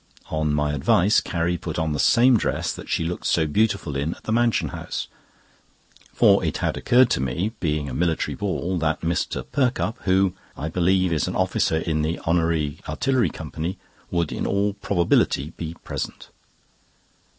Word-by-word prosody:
On 80 -1 0
my 75 0 0
advice, 85 +8 +3
Carrie 85 0 -1
put 80 -2 -5
on 80 -2 0
the 75 - -3
same 125 - +5
dress 110 - 0
that - - -10
she - - 0
looked 85 +2 -3
so 80 - +2
beautiful 100 -2 0
in 70 +4 -1
at - - -19
the - - -3
Mansion 115 -9 +2
House, - - -5 1.0
for - - +4
it - - -1
had - - -1
occurred 125 0 +4
to - - +2
me, 75 - -1
being 75 -3 -1
a 65 - -5
military 80 +2 0
ball, 95 -2 -2
that 80 -1 0
Mr. 85 0 -1
Perkupp, 125 -3 0
who, 95 0 +3 0.2
I 80 - -3
believe, 90 +1 +2
is 75 - 0
an - - -3
officer 80 - +1
in 80 -1 -1
the 80 +2 -1
Honorary 80 -3 +1
Artillery 130 -8 +1
Company, 80 +5 -5 0.3
would 85 -3 -1
in - - -2
all 100 +1 +1
probability 85 -6 +1
be 80 0 -6
present. - - -5
85 Hz, 170 wpm, -23 LUFS, 80-100 Hz, 1.0 s, same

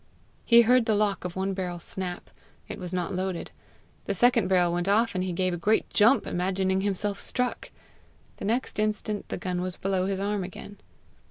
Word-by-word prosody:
He 235 -1 +7
heard 250 0 +4
the 220 - +3
lock 205 -3 0
of 180 - -5
one 190 +1 -1
barrel 180 -2 -3
snap: 180 +1 -3 0.4
it - - -7
was 180 -2 -6
not 180 -1 -2
loaded; 185 -1 -3 0.5
the 200 - -2
second 240 -1 +4
barrel 180 -2 +3
went 175 +1 -1
off, 225 +3 +3
and 185 -1 -1
he 185 - -2
gave 185 +1 0
a - - -2
great 210 +6 +1
jump, 225 +6 +4
imagining 190 +1 0
himself 200 0 -2
struck. 250 -1 -2 0.7
The - - -6
next 230 +1 -1
instant 215 -1 -2
the - - -3
gun 180 -1 -3
was 185 -1 -4
below 190 -1 -1
his 195 -1 -2
arm 200 0 -1
again. 195 +2 -9
190 Hz, 190 wpm, -27 LUFS, 185-210 Hz, 0.7 s, He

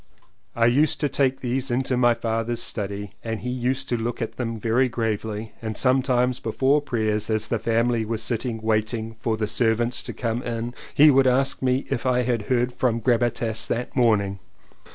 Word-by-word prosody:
I 115 - +3
used 140 +6 +3
to 145 - +1
take 135 -1 +1
these 130 +2 -1
into 130 +1 0
my 120 -1 +4
father's 115 0 -2
study 100 -1 -4
and 115 -1 -4
he 125 - -3
used 125 +1 -1
to 120 - +1
look 115 +1 -3
them 115 0 -3
over 115 - -7
very 120 +4 +2
gravely 110 -2 -3
and 110 -2 -4
sometimes 130 -1 +2
before 135 +6 +1
prayers 110 -6 -1
as 110 -1 +1
the 115 - 0
family 115 +1 +1
were 110 +1 -2
sitting 115 0 -2
waiting 110 +1 -1
for 110 -1 -1
the 110 - 0
servants 115 +2 0
to - - -5
come 115 0 -2
in 120 0 -4 0.2
he 150 +1 +8
would 135 -1 +4
ask 135 +2 +2
me 130 +1 +1
if 130 -1 -1
I 125 -1 +2
had 120 -4 -1
heard 125 -1 +1
from 120 -2 0
Gabbitas 115 -1 0
that 120 +1 -3
morning. 100 -5 +2
120 Hz, 185 wpm, -24 LUFS, 110-125 Hz, 0.2 s, he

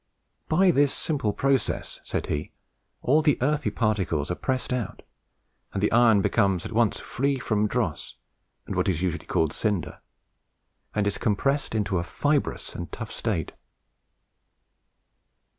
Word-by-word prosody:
"By 180 +3 +5
this 145 -3 +3
simple 140 -9 -1
process," 135 0 0
said - - -2
he, 75 0 -3 0.5
"all 150 +5 +4
the 150 -2 +3
earthy 150 +2 +1
particles 95 - 0
are - - 0
pressed 130 +2 -1
out 125 -3 -3 0.7
and 100 - -2
the 105 - +3
iron 115 -4 +5
becomes 100 -6 +2
at - - -5
once 115 -1 +2
free 140 +2 -1
from 105 -4 +1
dross, - - -2 0.5
and - - -4
what - - +1
is 90 -1 0
usually 90 -2 -2
called 80 -2 +1
cinder, 95 -9 -1 1.0
and 105 -1 +1
is 100 - -1
compressed 135 +5 0
into 100 -4 +1
a - - -2
fibrous 145 - -1
and 85 -3 -6
tough - - -6
state." - - -2
110 Hz, 140 wpm, -26 LUFS, 95-135 Hz, 1.0 s, By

